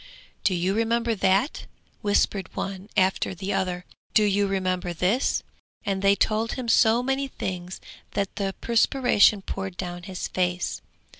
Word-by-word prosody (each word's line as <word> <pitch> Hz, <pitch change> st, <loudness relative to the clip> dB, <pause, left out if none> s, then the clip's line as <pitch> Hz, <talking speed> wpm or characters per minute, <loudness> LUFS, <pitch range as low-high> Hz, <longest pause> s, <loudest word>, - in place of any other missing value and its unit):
'Do 185 Hz, -, +2 dB
you 180 Hz, +2 st, 0 dB
remember 230 Hz, +1 st, +1 dB
that?' 195 Hz, +6 st, +1 dB, 0.3 s
whispered 205 Hz, -3 st, +1 dB
one 195 Hz, +1 st, -5 dB
after 190 Hz, 0 st, +2 dB
the 190 Hz, +3 st, -3 dB
other; 180 Hz, -1 st, -1 dB, 0.3 s
'Do 215 Hz, -, +6 dB
you 205 Hz, 0 st, +2 dB
remember 185 Hz, -2 st, -1 dB
this?' 190 Hz, +10 st, +1 dB, 0.4 s
and 195 Hz, -2 st, -1 dB
they 200 Hz, 0 st, +5 dB
told 220 Hz, +2 st, 0 dB
him 255 Hz, -2 st, -5 dB
so 230 Hz, +1 st, +4 dB
many 270 Hz, +1 st, 0 dB
things 180 Hz, -7 st, -5 dB, 0.4 s
that 200 Hz, -1 st, -1 dB
the 195 Hz, -2 st, -2 dB
perspiration 230 Hz, -4 st, +4 dB
poured 190 Hz, -2 st, -5 dB
down 175 Hz, -1 st, -5 dB
his 185 Hz, 0 st, -5 dB
face. 180 Hz, 0 st, -1 dB
195 Hz, 145 wpm, -25 LUFS, 185-220 Hz, 0.4 s, Do